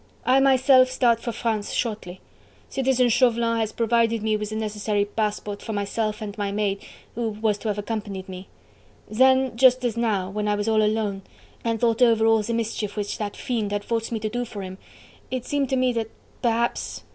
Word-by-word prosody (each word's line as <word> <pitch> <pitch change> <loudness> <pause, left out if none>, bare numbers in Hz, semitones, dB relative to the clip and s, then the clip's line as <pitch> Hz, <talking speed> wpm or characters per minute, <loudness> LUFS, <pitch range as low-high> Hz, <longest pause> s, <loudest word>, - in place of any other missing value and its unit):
I 260 +2 +5
myself 260 -1 +5
start 245 -3 +2
for 235 - -4
France 220 -2 -2
shortly. 210 -6 -3 0.5
Citizen 260 -2 +2
Chauvelin 235 -1 +2
has 220 -1 -1
provided 230 -1 +1
me 220 -1 +1
with 210 0 -3
the 215 - -5
necessary 210 -1 -1
passport 210 -1 -3
for 220 - -5
myself 210 +2 -2
and 205 -1 -6
my 200 -1 -1
maid, 200 -1 -1 0.3
who 230 -1 -2
was 210 -1 -1
to 225 - -5
have 210 -1 -1
accompanied 205 -3 -4
me.... 185 0 -8 0.6
Then, 260 +2 +3
just 255 +1 +5
now, 215 -6 0
when 210 +1 -2
I 210 - +2
was 205 +1 -2
all 220 -1 +3
alone... 210 -2 0 0.4
and 230 -1 -1
thought 230 0 +1
over 230 -2 +5
all 225 -1 +4
the 215 +3 -4
mischief 220 -2 -3
which 205 +3 -3
that 205 -1 -4
fiend 220 -5 -2
had 205 0 -2
forced 230 0 -2
me 225 - -1
to 215 - -1
do 245 +2 -2
for 210 -4 -7
him, 190 0 -8 0.5
it 255 -1 -3
seemed 285 -2 -1
to 265 - +1
me 255 -1 +2
that 225 -2 -2 0.3
perhaps..." 235 -1 -1
220 Hz, 195 wpm, -24 LUFS, 210-240 Hz, 0.6 s, I